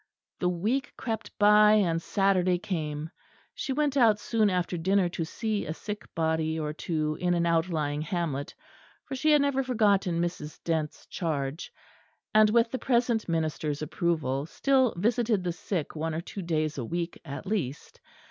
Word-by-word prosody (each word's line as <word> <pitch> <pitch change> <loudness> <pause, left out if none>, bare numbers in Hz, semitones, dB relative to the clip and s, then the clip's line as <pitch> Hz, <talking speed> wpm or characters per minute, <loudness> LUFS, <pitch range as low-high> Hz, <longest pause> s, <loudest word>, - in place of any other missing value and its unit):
The 180 - +1
week 220 +10 -1
crept 225 -2 -4
by, 210 0 +6
and 170 -6 +2
Saturday 185 -2 +2
came. 155 -4 -4 0.4
She 275 - -4
went 290 0 +1
out 225 -6 +5
soon 220 -2 +2
after 180 -1 -1
dinner 190 +2 +2
to 170 - -3
see 215 +5 -2
a 155 - -4
sick 210 +3 -6
body 160 0 0
or 150 -1 -2
two 155 -1 -2
in 175 -1 +2
an 170 0 +1
outlying 160 -3 0
hamlet; 155 -4 -3 0.5
for 275 - -7
she 310 +4 +2
had 295 -1 +5
never 280 -1 +1
forgotten 205 -8 +2
Mrs. 170 -3 -3
Dent's 160 -3 -2
charge, 150 -3 -3 0.6
and, 215 0 +6
with 230 +1 +3
the 260 - -2
present 235 -5 +1
minister's 155 -2 -1
approval, 155 -4 -1
still 260 +3 +2
visited 220 0 +1
the 175 -1 -1
sick 175 -2 -4
one 160 +1 -2
or 165 - -2
two 195 +3 -7
days 155 -4 -1
a - - -2
week 170 +6 -4
at 140 +3 -7
least. 175 - -3
175 Hz, 165 wpm, -28 LUFS, 160-215 Hz, 0.6 s, by